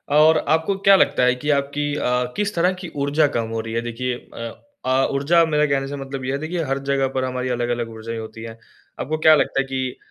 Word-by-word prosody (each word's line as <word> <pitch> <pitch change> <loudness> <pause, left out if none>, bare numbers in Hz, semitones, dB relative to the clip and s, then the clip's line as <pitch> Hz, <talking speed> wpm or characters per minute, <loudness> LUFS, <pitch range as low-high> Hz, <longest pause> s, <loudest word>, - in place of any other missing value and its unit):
और 155 +1 +6 0.2
आपको 160 +5 +1
क्या 195 0 +8
लगता 155 - +3
है 125 0 +4
कि 145 +4 -5
आपकी, 145 +1 -1
अ, 125 -3 0
किस 210 0 -1
तरह 180 +2 +2
की 180 - -6
ऊर्जा 145 +2 +3
कम 115 -1 -1
हो 115 - -3
रही 115 0 -7
है? 115 - 0
देखिए, 120 +2 -3 0.2
अ 115 0 -6 0.3
अ, 130 +1 +2
ऊर्जा 155 +5 +3
मेरे 150 -1 +2
कहने 135 -1 0
से 145 - -5
मतलब 135 -1 -6
ये 130 - -1
है 140 - -1
देखिए 165 +3 -3
हर 135 0 0
जगह 135 -1 +2
पर 130 0 -2
हमारी 130 0 -2
अलग-अलग 120 -1 -1
ऊर्जाएँ 115 +1 -6
होती 110 0 -9
हैं, 115 0 -8 0.4
आपको 155 +4 -2
क्या 155 0 +9
लगता 140 - +1
है 135 - +1
कि 130 -1 -3
135 Hz, 240 wpm, -21 LUFS, 125-150 Hz, 0.4 s, क्या